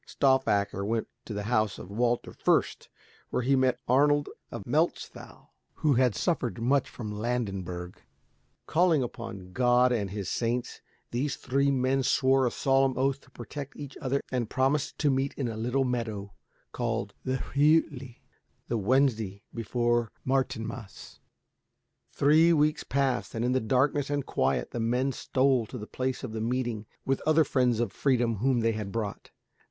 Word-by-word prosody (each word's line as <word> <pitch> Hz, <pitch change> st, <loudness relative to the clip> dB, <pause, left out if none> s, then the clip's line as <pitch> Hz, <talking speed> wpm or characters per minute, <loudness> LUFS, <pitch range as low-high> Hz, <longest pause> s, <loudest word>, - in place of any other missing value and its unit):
Stauffacher 105 Hz, -8 st, +2 dB
went 110 Hz, +2 st, -1 dB, 0.2 s
to 110 Hz, -, -6 dB
the 105 Hz, -, -3 dB
house 110 Hz, -2 st, +1 dB
of 95 Hz, -, -10 dB
Walter 120 Hz, +3 st, 0 dB
Fürst, -, -, +1 dB, 0.4 s
where 125 Hz, -, -1 dB
he 135 Hz, +3 st, +3 dB
met 130 Hz, -2 st, +2 dB
Arnold 145 Hz, +3 st, +3 dB, 0.2 s
of 115 Hz, -4 st, -7 dB
Melchthal, 155 Hz, +7 st, -2 dB, 0.2 s
who 150 Hz, -2 st, +2 dB
had 125 Hz, -3 st, +3 dB
suffered 125 Hz, -9 st, -1 dB
much 130 Hz, +3 st, +2 dB
from 110 Hz, -4 st, -6 dB
Landenberg. 100 Hz, -6 st, -3 dB, 0.6 s
Calling 165 Hz, -4 st, +3 dB
upon 115 Hz, -7 st, -7 dB
God 125 Hz, +2 st, +4 dB
and 105 Hz, -5 st, 0 dB
his 100 Hz, -1 st, -5 dB
saints, 120 Hz, +3 st, -2 dB, 0.3 s
these 135 Hz, +3 st, -1 dB
three 140 Hz, +2 st, +1 dB
men 135 Hz, 0 st, +1 dB
swore 130 Hz, 0 st, +3 dB
a -, -, +2 dB
solemn 135 Hz, -1 st, +2 dB
oath 135 Hz, +1 st, +1 dB
to -, -, -21 dB
protect 135 Hz, +3 st, -8 dB
each 145 Hz, -1 st, -8 dB
other 140 Hz, -1 st, 0 dB
and 120 Hz, -4 st, -1 dB
promised 135 Hz, +3 st, 0 dB
to 145 Hz, -2 st, +2 dB
meet 135 Hz, +1 st, -1 dB
in 135 Hz, -, -2 dB
a 115 Hz, -, -4 dB
little 125 Hz, +5 st, 0 dB
meadow 110 Hz, -5 st, -3 dB, 0.4 s
called 115 Hz, -4 st, -2 dB
the 130 Hz, 0 st, -1 dB, 0.2 s
Rütli, 140 Hz, -4 st, +2 dB, 0.5 s
the 115 Hz, -, 0 dB
Wednesday 110 Hz, -4 st, +1 dB
before 120 Hz, 0 st, 0 dB
Martinmas. 120 Hz, -4 st, -3 dB, 0.9 s
Three 155 Hz, +4 st, +5 dB
weeks 150 Hz, -1 st, +2 dB
passed, 135 Hz, -3 st, -1 dB
and 115 Hz, +1 st, -1 dB
in 125 Hz, -, +1 dB
the 130 Hz, -, +2 dB
darkness 135 Hz, +4 st, +1 dB
and 145 Hz, -2 st, -1 dB
quiet 65 Hz, +1 st, 0 dB
the 120 Hz, -, -4 dB
men 125 Hz, +4 st, +1 dB
stole 130 Hz, -3 st, +1 dB
to 125 Hz, -, -7 dB
the 105 Hz, -, -6 dB
place 130 Hz, +4 st, -3 dB
of 120 Hz, -4 st, -5 dB
meeting 115 Hz, -1 st, -2 dB, 0.2 s
with 135 Hz, 0 st, 0 dB
other 155 Hz, +1 st, +5 dB
friends 125 Hz, -5 st, +1 dB
of 120 Hz, -4 st, 0 dB
freedom 120 Hz, -5 st, +1 dB
whom 125 Hz, +2 st, +2 dB
they 115 Hz, 0 st, +2 dB
had 105 Hz, -3 st, -4 dB
brought. 105 Hz, -2 st, -4 dB
125 Hz, 160 wpm, -28 LUFS, 115-135 Hz, 0.9 s, Three